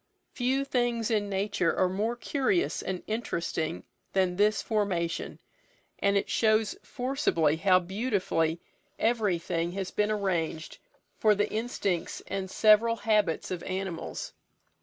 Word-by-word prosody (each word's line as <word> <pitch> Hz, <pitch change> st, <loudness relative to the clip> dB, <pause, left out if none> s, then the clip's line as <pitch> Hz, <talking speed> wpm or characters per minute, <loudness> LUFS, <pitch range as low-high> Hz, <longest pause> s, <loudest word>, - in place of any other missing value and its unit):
Few 265 Hz, +2 st, 0 dB
things 240 Hz, -3 st, 0 dB
in 205 Hz, -2 st, +1 dB
nature 195 Hz, -3 st, 0 dB
are 185 Hz, -, +4 dB
more 210 Hz, +6 st, -1 dB
curious 285 Hz, +8 st, 0 dB
and 185 Hz, -1 st, -4 dB
interesting 170 Hz, -7 st, -2 dB, 0.3 s
than 185 Hz, -2 st, +2 dB
this 210 Hz, +3 st, +3 dB
formation, 185 Hz, -6 st, -1 dB, 0.6 s
and 200 Hz, 0 st, +3 dB
it 200 Hz, -, 0 dB
shows 215 Hz, -1 st, +2 dB
forcibly 245 Hz, -, 0 dB
how 185 Hz, +2 st, +5 dB
beautifully 185 Hz, -4 st, 0 dB, 0.4 s
everything 175 Hz, -7 st, 0 dB
has 190 Hz, -1 st, -4 dB
been 210 Hz, 0 st, +1 dB
arranged 175 Hz, -6 st, -2 dB, 0.4 s
for 215 Hz, -1 st, +5 dB
the 205 Hz, -, 0 dB
instincts 210 Hz, -6 st, -2 dB
and 195 Hz, -1 st, -4 dB
several 220 Hz, +3 st, +5 dB
habits 210 Hz, -8 st, +1 dB
of 180 Hz, -2 st, -3 dB
animals. 185 Hz, -3 st, -4 dB
200 Hz, 120 wpm, -28 LUFS, 180-225 Hz, 0.6 s, how